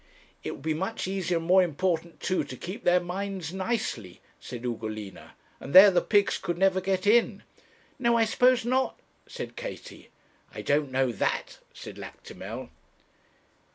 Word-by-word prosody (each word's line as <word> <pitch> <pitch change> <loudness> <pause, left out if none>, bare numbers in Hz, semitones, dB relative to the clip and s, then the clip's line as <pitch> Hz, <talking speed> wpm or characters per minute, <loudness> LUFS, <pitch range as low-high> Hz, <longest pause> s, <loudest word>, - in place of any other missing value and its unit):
'It - - -5
would - - -7
be 160 0 0
much 190 +6 -3
easier, 185 -2 -1
and 165 - -4
more 185 +2 +6
important 170 0 -1
too, 185 - 0
to 130 - -9
keep 185 - -7
their 180 +1 +4
minds 185 -1 -5
nicely,' 190 - -3 0.2
said 120 -1 -8
Ugolina; 110 -4 -6 0.2
and 140 - -7
there 195 +2 +11
the 180 - +3
pigs 205 -1 +2
could 175 -2 -3
never 190 0 +3
get 190 0 -1
in.' 220 -1 +3 0.6
'No; 235 -1 +3
I 225 - +4
suppose 250 +2 +3
not,' 260 +2 0 0.3
said - - -7
Katie. - - -8 0.5
'I - - -5
don't 145 -1 +1
know 130 -1 +1
that,' - - -2
said - - -10
Lactimel. - - -9
185 Hz, 155 wpm, -27 LUFS, 155-200 Hz, 0.6 s, there